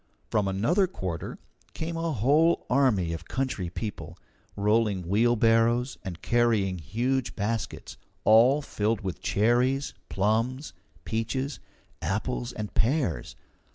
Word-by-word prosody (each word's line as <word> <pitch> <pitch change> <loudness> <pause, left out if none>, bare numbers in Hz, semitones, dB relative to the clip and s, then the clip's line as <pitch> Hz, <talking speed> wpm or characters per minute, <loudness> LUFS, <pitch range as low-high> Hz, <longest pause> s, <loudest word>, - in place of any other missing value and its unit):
From 105 -2 +2
another 135 - +2
quarter 90 - -5 0.4
came 165 +1 -4
a 165 0 -1
whole 150 +7 +3
army 115 -11 +2
of 80 +1 -6
country 130 -10 -2
people, 105 +5 -6 0.4
rolling 105 -3 +1
wheelbarrows 115 +3 +3
and 90 -3 -7
carrying 110 -6 +2
huge 120 - -1
baskets, 110 +2 -3 0.3
all 125 +7 +5
filled 110 -3 -1
with 95 -3 -5
cherries, 125 +5 +1 0.2
plums, 115 +8 0 0.3
peaches, 130 +5 -2 0.4
apples, 120 +5 -2
and 105 -1 -6
pears. 115 - 0
115 Hz, 110 wpm, -27 LUFS, 100-130 Hz, 0.4 s, all